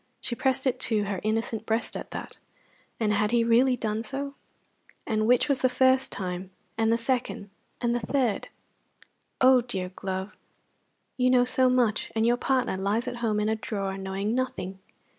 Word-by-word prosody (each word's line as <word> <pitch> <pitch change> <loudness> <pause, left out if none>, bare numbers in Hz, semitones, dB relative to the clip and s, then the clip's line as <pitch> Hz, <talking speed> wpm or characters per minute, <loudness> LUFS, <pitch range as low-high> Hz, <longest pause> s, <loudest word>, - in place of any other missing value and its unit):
She - - -2
pressed 265 +2 0
it 255 -1 +1
to 215 -4 +1
her 200 -2 -3
innocent 225 0 -2
breast 225 +1 0
at - - -6
that. - - -7 0.6
And 215 -2 +1
had 210 +1 +2
he 235 0 +3
really 245 +3 +4
done 215 -1 -2
so? 275 +3 -4 0.7
and 215 0 0
which 250 +3 +4
was 280 -3 +1
the 255 - +4
first 260 +1 +3
time, 185 -1 -4 0.3
and 225 0 +2
the 230 - +3
second, 230 -4 -2 0.3
and 240 -1 +1
the - - +1
third? 240 -1 0 0.9
Oh, 255 -1 +7
dear 190 -7 -2
glove, 190 +1 -5 0.8
you 255 0 +3
know 250 -1 +5
so 255 +1 +3
much, 240 -4 +1
and 220 0 +2
your 240 +1 +3
partner 255 -6 0
lies 205 +6 0
at 245 -1 -4
home 220 -3 0
in 210 - 0
a 220 - +1
drawer 195 -3 -3
knowing 195 +2 -2
nothing. 195 -7 -3
230 Hz, 180 wpm, -27 LUFS, 210-255 Hz, 0.9 s, Oh